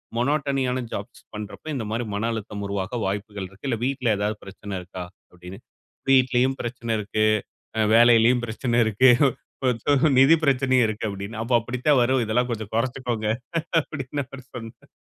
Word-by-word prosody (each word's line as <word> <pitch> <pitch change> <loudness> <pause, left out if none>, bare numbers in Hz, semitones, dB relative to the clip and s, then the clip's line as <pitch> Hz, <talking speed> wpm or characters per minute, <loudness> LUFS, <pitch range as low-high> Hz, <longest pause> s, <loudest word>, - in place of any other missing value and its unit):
மோனோட்டனியான 135 -1 0
jobs - - -7
பண்றப்ப 105 +7 -8
இந்த 125 - -2
மாரி 115 +2 -1
மன 110 +3 -1
அழுத்தம் 105 -2 -5
உருவாக 100 +4 -3
வாய்ப்புகள் 100 0 -4
இருக்கு. 100 +8 -15
இல்ல 115 -3 -1
வீட்ல 130 -5 +1
ஏதாவது 105 +1 -1
பிரச்சன 100 +1 -8
இருக்கா?" 90 0 -7 0.3
அப்டினு. 90 +3 -11 0.5
"வீட்லயும் 130 0 +3
பிரச்சன 120 -1 -3
இருக்கு. 110 +1 0 0.5
அ - - +1 0.2
வேலையிலும் 120 +1 +6
பிரச்சன 120 +1 -1
இருக்கு. 110 +4 +5 0.6
கொஞ்சம் 130 +4 +2
நிதி 135 +5 +7
பிரச்சனையும் 130 -3 +3
இருக்கு." 110 0 -3
"அப்டின்னா, 100 +3 -6
அப்ப 120 0 +2
அப்படித்தான் 125 +4 +1
வரும். 130 0 +2
இதெல்லாம் 125 +3 0
கொஞ்சம் 110 -2 -5
கொறச்சுக்கோங்க." 120 -2 -1 0.5
அப்டின்னு 145 -1 -5
அவரு 135 -2 -11
சொன்னார். 115 -2 -10
120 Hz, 150 wpm, -24 LUFS, 105-130 Hz, 0.6 s, நிதி